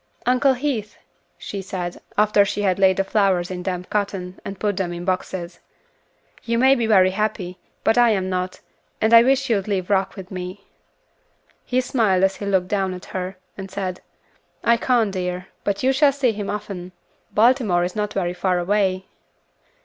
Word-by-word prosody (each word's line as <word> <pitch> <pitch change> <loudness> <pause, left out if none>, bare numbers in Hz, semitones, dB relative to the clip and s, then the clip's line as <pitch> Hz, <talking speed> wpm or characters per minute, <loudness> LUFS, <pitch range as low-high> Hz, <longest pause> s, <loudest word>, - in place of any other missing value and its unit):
"Uncle 255 +2 +4
Heath," 245 -6 -3 0.4
she 200 - -6
said, 180 -2 -5 0.2
after 210 -1 +5
she 205 +1 -2
had 190 -1 +1
laid 190 -1 +4
the 195 - +2
flowers 195 -3 +1
in 180 -1 -4
damp 180 -1 -4
cotton, 195 -3 -2
and 195 -1 -7
put 205 -2 0
them 185 -3 -1
in 175 0 -6
boxes, 185 -1 -3 0.8
"you 230 0 0
may 265 +3 +6
be 235 -4 0
very 190 -4 +5
happy, 190 -3 -2 0.2
but 225 +2 +3
I 240 -1 +6
am 190 -4 +1
not, 185 0 -3 0.4
and 220 +1 +2
I 230 - +10
wish 270 +2 +2
you'd 210 -5 0
leave 195 -2 -2
Rock 195 -1 +1
with 190 -1 -10
me." 185 +2 -7 1.0
He 255 0 +1
smiled 215 -7 +1
as 195 0 +2
he 200 - -5
looked 190 -2 +1
down 190 -2 -1
at 180 - -10
her, 185 0 -4 0.2
and 195 -1 -7
said, 185 -1 -4 0.6
"I 235 - +5
can't, 235 -3 +1
dear 180 -1 -3
child, 185 - -21
but 200 +2 -1
you 265 +1 +3
shall 285 +1 +4
see 270 -3 +1
him 205 -2 -5
often. 195 -3 -5 0.4
Baltimore 220 -6 +3
is 180 0 -3
not 210 -1 -1
very 175 -3 -1
far 180 0 0
away." 190 +1 0
195 Hz, 185 wpm, -22 LUFS, 185-220 Hz, 1.0 s, I